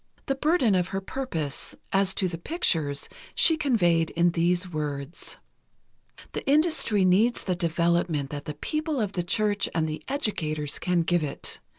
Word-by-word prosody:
The 275 - +1
burden 275 - +2
of 180 -1 +2
her 195 0 -3
purpose, 180 - -4 0.2
as 195 -1 +2
to 190 - +1
the 165 -2 -5
pictures, 165 - 0 0.3
she 325 - +5
conveyed 175 - +2
in 170 +1 +2
these 175 +2 +1
words: 150 -2 -3 0.9
"The - - -4
industry 290 - +3
needs 210 +7 +3
the 185 - 0
development 170 -3 0
that 145 -1 -6
the 150 - -5
people 305 - -2
of 210 -4 -1
the 180 - -2
church 205 +3 +1
and 160 -1 +1
the 155 0 -5
educators 155 - -1
can 180 -2 +1
give 175 -1 +1
it. 140 -2 -3
180 Hz, 160 wpm, -26 LUFS, 160-220 Hz, 0.9 s, she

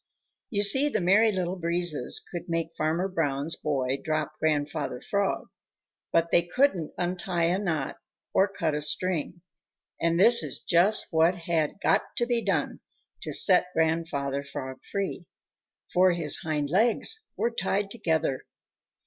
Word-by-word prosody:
You 205 -5 0
see, 265 +8 +6
the 220 - -1
Merry 205 +5 +4
Little 185 -1 -3
Breezes 175 - 0
could 175 -1 -7
make 165 0 -3
Farmer 160 +4 -1
Brown's 160 -4 0
boy 135 -2 -2
drop 155 -1 -2
Grandfather 150 -3 -1
Frog, 200 +5 -2 0.6
but 165 0 +1
they 175 - +5
couldn't 180 - 0
untie 180 -1 -2
a 175 +3 +1
knot 160 -9 -3 0.4
or 195 - +4
cut 170 -6 -2
a 150 - -2
string, 175 +2 -1 0.6
and 170 0 +1
this 235 +5 +8
is - - -5
just 185 +5 +2
what 165 +2 +3
had 165 0 -2
got - - +3 0.2
to 240 - +1
be 240 -1 0
done - - -1 0.4
to - - -5
set 180 -2 +5
Grandfather 160 -4 -1
Frog 130 -2 -7
free, 195 -3 -4 0.7
for 185 0 +4
his 165 -4 +2
hind 150 -2 -3
legs 240 - +2
were 235 - 0
tied 200 -2 -2
together. 160 -7 -1
170 Hz, 145 wpm, -26 LUFS, 155-195 Hz, 0.7 s, this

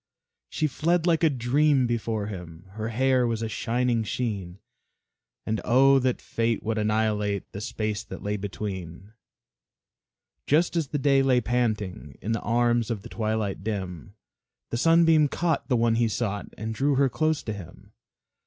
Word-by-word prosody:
She 155 - -1
fled 165 +4 +1
like 170 -2 +2
a 160 - +6
dream 135 +1 +2
before 115 -3 -1
him, 90 -4 -8
Her 110 +2 -4
hair 130 +1 +2
was 115 -1 -2
a - - -1
shining 120 +1 0
sheen, 100 -6 -3 0.9
And 110 0 -1
oh, 135 +3 +5
that 130 -1 -1
Fate 115 0 -1
would 110 0 -1
annihilate 105 -1 0
The 100 - -7
space 110 -1 -3
that - - -9
lay 105 +1 -1
between! 95 -1 -6 1.3
Just 165 +5 +2
as 165 -4 0
the 145 - -2
day 140 -1 +3
lay 130 -2 +3
panting 105 - -2
In 110 - -3
the 115 - -1
arms 120 0 +1
of 110 -4 -3
the 120 - -9
twilight 110 -4 -2
dim, 95 - -5 0.6
The 115 - -1
Sunbeam 165 +1 +5
caught 165 +3 -1
the 125 - +3
one 115 0 +3
he 115 0 +2
sought 105 -2 -2
And 110 +1 -4
drew 140 +5 +1
her 140 +1 +4
close 155 +3 0
to 110 - -3
him. 90 -5 -12
115 Hz, 160 wpm, -26 LUFS, 105-135 Hz, 1.3 s, a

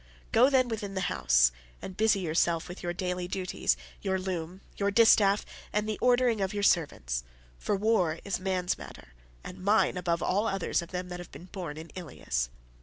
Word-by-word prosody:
Go, 250 +4 +6
then, 260 -2 +3
within 210 -4 -4
the 190 - -1
house, - - +4 0.3
and 190 - -8
busy 215 -1 +3
yourself 165 0 +1
with 180 - -8
your 175 - -2
daily 180 0 -3
duties, 185 0 -1 0.2
your 190 -2 0
loom, 185 -1 -4
your 200 0 0
distaff, 205 -2 +5 0.3
and 210 +1 0
the 215 - -3
ordering 245 -3 +3
of 195 +1 -1
your 205 - -1
servants; 60 - +1 0.4
for 205 - 0
war 195 -6 +2
is 200 -3 -1
man's 185 -1 -1
matter, - - -11 0.3
and 185 +1 -9
mine 205 -1 +3
above 170 -1 0
all 205 +4 +1
others 195 -3 0
of 170 - -9
them 180 0 -4
that 180 0 -6
have 175 - -10
been 175 - -11
born 170 -6 -5
in 160 +1 -9
Ilius." 60 - -3
185 Hz, 185 wpm, -29 LUFS, 170-205 Hz, 0.4 s, Go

